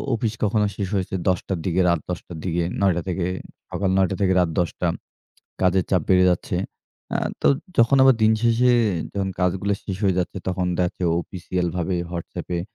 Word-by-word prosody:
Office 110 -1 -1
কখনো 105 0 +2
শেষ 100 -3 -2
হয়েছে 95 0 -2
১০:০০ 90 +1 -1
র - - -6
দিকে 95 +1 +2
রাত 85 -2 +2
১০:০০ 85 0 -6
র - - -7
দিকে। 85 -1 0 0.2
৯:০০ 90 -3 +3
থেকে 90 -1 -1 0.4
সকাল 95 +1 -1
৯:০০ 95 0 +2
থেকে 95 -1 +3
রাত 85 -2 0
১০:০০ 85 +1 -2 0.8
কাজের 95 0 +3
চাপ 90 -4 +3
বেড়ে 90 -1 +5
যাচ্ছে। 90 0 -1 0.6
আ - - +1 0.2
তো - - +5 0.3
যখন 120 +4 +5
আবার 135 -1 +7
দিন 110 0 +5
শেষে 120 +2 +4 0.4
যখন 95 -1 -1
কাজগুলা 95 +3 +1
শেষ 95 - -3
হয়ে 95 -2 +2
যাচ্ছে। 90 +2 -2
তখন 90 0 -1
দেখা 90 - +2
যাচ্ছে 90 - -7 0.2
অফিসিয়াল 90 -1 -3
ভাবে 90 +1 -1 0.2
WhatsApp 85 -1 -6
এ - - -1
95 Hz, 190 wpm, -23 LUFS, 90-100 Hz, 0.8 s, আবার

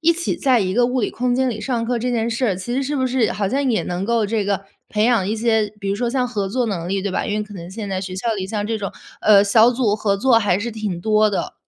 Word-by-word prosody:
一 330 +1 +4
起 340 0 -2
在 265 -6 +3
一 185 -1 -1
个 240 +2 +3
物 255 +1 0
理 - - 0
空 245 0 -1
间 260 0 +1
里 220 -2 -5
上 235 -2 -1
课 240 0 -1
这 250 +2 -1
件 230 -1 0
事， 225 -5 0
其 215 +6 -5
实 275 - 0
是 290 +2 -2
不 260 -1 +1
是 250 -3 +1
好 205 - -1
像 275 +3 0
也 220 - +1
能 180 +2 -3
够 230 -1 +1
这 215 0 -1
个 195 -1 -1 0.2
培 210 0 +1
养 230 -6 +3
一 210 - -1
些， 220 -2 +1
比 200 - -4
如 195 - +1
说 235 +2 -1
像 250 -1 0
合 205 -5 -2
作 245 +3 0
能 175 -5 -3
力， 195 +1 0
对 200 0 -2
吧？ - - -1
因 210 - -1
为 210 - -1
可 210 -1 -11
能 175 -1 -8
现 205 +1 -6
在 190 -1 -2
学 185 -1 -6
校 225 +4 -1
里 190 -2 -4
像 205 +1 -3
这 225 - -1
种， 200 -3 -5 0.3
呃， 205 -2 +6
小 220 +3 +5
组 235 -4 +1
合 210 -2 +1
作 235 +2 +4
还 200 -4 +1
是 230 +4 -3
挺 210 -6 -4
多 215 +2 +3
的。 195 - -3
220 Hz, 325 characters per minute, -20 LUFS, 200-245 Hz, 0.3 s, 呃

